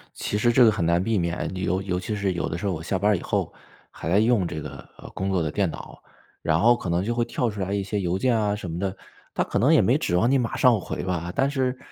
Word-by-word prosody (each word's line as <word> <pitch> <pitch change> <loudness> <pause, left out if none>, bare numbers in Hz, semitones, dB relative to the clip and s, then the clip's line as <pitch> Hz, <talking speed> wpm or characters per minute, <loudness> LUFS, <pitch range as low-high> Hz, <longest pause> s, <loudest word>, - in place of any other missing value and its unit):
其 105 - -2
实 120 +2 +3
这 125 +2 +6
个 110 - +6
很 95 -5 -1
难 85 +2 +2
避 115 +1 0
免， 85 -1 -2
你 90 - -5
尤 95 0 0
尤 90 -2 -2
其 105 +4 -4
是 100 -2 -1
有 85 - -2
的 80 - -3
时 95 - -6
候 100 - 0
我 80 - -5
下 95 +3 -1
班 105 +3 +2
儿 - - +3
以 - - -8
后， - - -2 0.4
还 80 - -6
在 95 +4 +4
用 110 -4 +2
这 80 - -5
个， 70 -2 -8 0.2
呃， - - -11
工 95 +1 -3
作 95 -2 +1
的 80 -2 -2
电 100 -1 0
脑， - - -10 0.4
然 80 0 +1
后 120 +5 +5
可 110 -7 -5
能 85 +2 +1
就 115 +4 -1
会 120 0 +1
跳 120 0 -1
出 105 -1 -7
来 95 +1 -2
一 100 -1 -1
些 100 +1 -2
邮 90 -1 -1
件 125 +4 +1
啊 105 -1 0
什 95 -4 -6
么 80 +1 -4
的， 95 0 -2 0.4
他 - - +1
可 - - -2
能 - - +4
也 - - +6
没 - - +3
指 90 - -1
望 115 +7 +3
你 135 - +4
马 120 -2 -2
上 125 -4 +4
回 - - -5
吧， 90 -1 -3
但 135 - +2
是 130 -2 -1
95 Hz, 325 characters per minute, -24 LUFS, 90-115 Hz, 0.4 s, 这